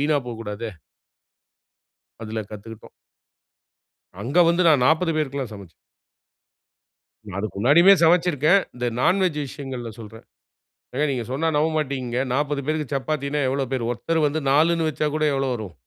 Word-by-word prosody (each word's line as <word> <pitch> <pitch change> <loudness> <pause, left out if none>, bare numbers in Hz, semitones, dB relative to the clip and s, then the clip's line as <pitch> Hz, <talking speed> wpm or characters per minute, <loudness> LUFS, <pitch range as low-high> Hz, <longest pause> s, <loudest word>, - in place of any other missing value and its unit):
வீணா 150 +1 +2
போகூடாதே. 115 -1 -6 1.5
அதுல 110 0 -4
கத்துக்கிட்டோம். 110 +1 -10 1.3
அங்க 140 +9 -1
வந்து 170 +2 +3
நான் 140 -6 +4
40 165 +2 +2
பேருக்கெல்லாம் 140 -5 -2
சமைச்சேன். 95 -5 -12 1.5
நான் 100 -1 -6
அதுக்கு 100 -1 -4
முன்னாடியுமே 170 - +6
சமைச்சிருக்கேன். 170 +1 +4
இந்த 120 0 -3
நான் 185 +7 +3
வெஜ் 170 -5 0
விஷயங்கள்ல 130 -4 -7
சொல்றேன். 110 0 -11 0.7
ஏங்க 150 - +1
நீங்க 120 -3 -3
சொன்னா 160 +5 -1
நம்பமாட்டீங்க 140 -5 -1
40 145 0 -1
பேருக்கு 155 -2 -2
சப்பாத்தின்னா 145 +1 -2
எவ்ளோ 135 0 -1
பேரு, 125 -3 -1
ஒருத்தரு 160 +8 -1
வந்து 150 +2 -2
4னு 160 +3 +3
வச்சா 150 0 -1
கூட 155 0 +1
எவ்ளோ 135 -1 0
வரும்! 105 -7 -7
140 Hz, 130 wpm, -23 LUFS, 115-155 Hz, 1.5 s, முன்னாடியுமே